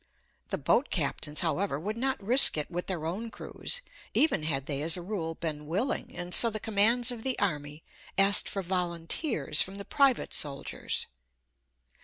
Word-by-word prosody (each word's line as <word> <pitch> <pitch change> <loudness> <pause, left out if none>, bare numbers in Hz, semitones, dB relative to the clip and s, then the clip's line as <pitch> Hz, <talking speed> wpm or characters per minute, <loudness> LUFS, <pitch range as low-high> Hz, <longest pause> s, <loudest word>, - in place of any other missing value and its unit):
The - - -3
boat - - 0
captains, 150 0 0
however, 170 -2 -2
would 210 +7 -5
not 265 +3 -2
risk 245 - +5
it 150 +3 -3
with 175 +1 -5
their 175 -5 -4
own 200 +8 -5
crews, - - -4 0.3
even 305 - +2
had 135 -4 -2
they 140 -1 -3
as 160 +3 +4
a - - -7
rule 170 -4 -5
been 150 -3 -5
willing, 200 - -2
and 175 0 0
so 230 - +9
the 215 -1 -4
commands 225 +4 +2
of 240 -2 -8
the 260 +1 -1
army 150 -5 -3 0.3
asked 195 +1 +6
for 195 - -5
volunteers 170 - -1
from 190 - -3
the 200 0 -5
private 275 -3 +1
soldiers. 140 -2 -2
185 Hz, 170 wpm, -28 LUFS, 155-225 Hz, 0.3 s, so